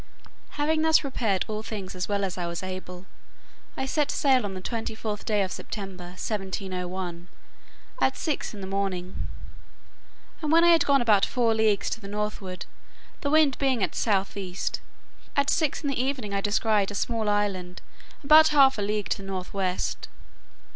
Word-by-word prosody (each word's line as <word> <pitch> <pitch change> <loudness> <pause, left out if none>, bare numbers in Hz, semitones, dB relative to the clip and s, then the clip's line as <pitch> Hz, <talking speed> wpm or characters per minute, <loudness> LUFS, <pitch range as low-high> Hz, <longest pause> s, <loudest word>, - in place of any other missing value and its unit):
Having 310 +2 +2
thus 320 0 +5
prepared 225 - 0
all 215 0 -3
things 205 -4 -6
as 185 +1 -4
well 200 -1 0
as 190 -2 -2
I 175 -1 -3
was 170 +2 -4
able, 185 -1 -7 0.7
I 265 - -1
set 290 +2 0
sail 265 -5 +3
on 195 -2 -4
the - - -4
twenty 225 +3 -4
fourth 215 -1 -4
day 210 -3 +2
of 185 - -4
September 185 -3 -7
1701, 185 -3 -4 0.7
at 265 - +2
six 310 -3 -2
in 200 - -8
the - - -4
morning; 190 -2 -3 1.1
and 305 -2 -1
when 330 +1 +6
I 345 - +6
had 330 -3 +5
gone 275 -3 +4
about 210 -4 +4
four 235 -3 +2
leagues 220 -2 +2
to 230 - -3
the 200 - -8
northward, 205 -3 -4 0.6
the 285 - -1
wind 300 -3 +4
being 260 -6 +2
at - - 0
south 200 -3 0
east, 190 -2 -3 0.5
at 280 0 +3
six 315 -2 0
in 285 - 0
the 265 -3 0
evening 255 -6 -2
I 200 - 0
descried 205 -1 +2
a 205 - -6
small 225 -1 0
island, 195 -4 -1 0.4
about 310 +3 +8
half 275 -6 +5
a - - 0
league 210 0 -1
to - - +1
the 195 -1 -9
north 185 -2 -5
west. 185 -2 -2
210 Hz, 180 wpm, -26 LUFS, 190-265 Hz, 1.1 s, about